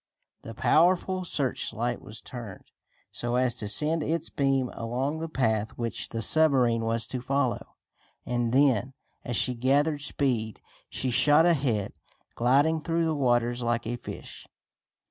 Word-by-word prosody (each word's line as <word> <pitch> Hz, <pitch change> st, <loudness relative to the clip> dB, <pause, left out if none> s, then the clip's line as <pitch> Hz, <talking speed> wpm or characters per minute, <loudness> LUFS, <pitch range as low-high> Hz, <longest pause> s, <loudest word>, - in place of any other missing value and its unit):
The 115 Hz, -, -9 dB
powerful 185 Hz, -, +2 dB
searchlight 120 Hz, -5 st, -2 dB
was 110 Hz, -, -10 dB
turned, 115 Hz, -7 st, -10 dB, 0.4 s
so 120 Hz, 0 st, -3 dB
as 125 Hz, -1 st, +2 dB
to 110 Hz, -4 st, -4 dB
send 155 Hz, +10 st, +4 dB
its 165 Hz, +3 st, -2 dB
beams 135 Hz, -2 st, 0 dB
along 130 Hz, +7 st, -3 dB
the 165 Hz, 0 st, -5 dB
path 110 Hz, -7 st, -1 dB
which 115 Hz, -1 st, -3 dB
the 115 Hz, -1 st, -3 dB
submarine 130 Hz, -7 st, +3 dB
was 115 Hz, 0 st, 0 dB
to 125 Hz, -, -5 dB
follow, 135 Hz, -1 st, -2 dB, 0.5 s
and 120 Hz, -1 st, -1 dB
then, 130 Hz, -1 st, +2 dB, 0.3 s
as 120 Hz, -, -3 dB
she 125 Hz, -, +1 dB
gathered 145 Hz, +5 st, +1 dB
speed, 120 Hz, -7 st, -1 dB, 0.3 s
she 130 Hz, -, -2 dB
shot 145 Hz, +6 st, +5 dB
ahead, 135 Hz, -, +1 dB, 0.4 s
gliding 145 Hz, +7 st, +2 dB
through 165 Hz, +1 st, 0 dB
the 160 Hz, -, 0 dB
waters 120 Hz, -3 st, +1 dB
like 120 Hz, 0 st, -1 dB
a 120 Hz, +2 st, -3 dB
fish. 120 Hz, -, -9 dB
125 Hz, 145 wpm, -27 LUFS, 115-145 Hz, 0.5 s, shot